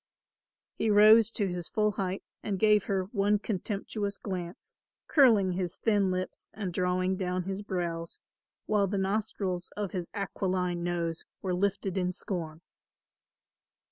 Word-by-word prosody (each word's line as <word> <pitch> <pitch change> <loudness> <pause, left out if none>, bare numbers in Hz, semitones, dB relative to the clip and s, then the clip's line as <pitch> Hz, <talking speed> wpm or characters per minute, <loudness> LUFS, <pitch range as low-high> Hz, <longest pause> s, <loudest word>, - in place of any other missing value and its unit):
He 225 - -1
rose 215 +2 +7
to 205 - 0
his 175 -2 -4
full 210 -1 +2
height 190 -1 -3 0.2
and 200 -2 -2
gave 210 0 +4
her 195 -2 0
one 205 -1 +2
contemptuous 205 0 -3
glance, 180 -3 -6 0.3
curling 225 - +5
his 180 -1 -2
thin 205 -4 +2
lips 185 0 -3
and 195 -5 -4
drawing 185 +1 +1
down 185 -1 -1
his 195 +2 -4
brows, 170 -4 -3 0.5
while 205 -2 +2
the 200 +1 -2
nostrils 190 -2 -1
of 205 -3 -2
his 180 -3 -4
aquiline 185 -3 -1
nose 170 -1 -2 0.2
were 185 -2 0
lifted 195 0 0
in 180 0 0
scorn. 165 -4 -4
190 Hz, 140 wpm, -29 LUFS, 180-205 Hz, 0.5 s, rose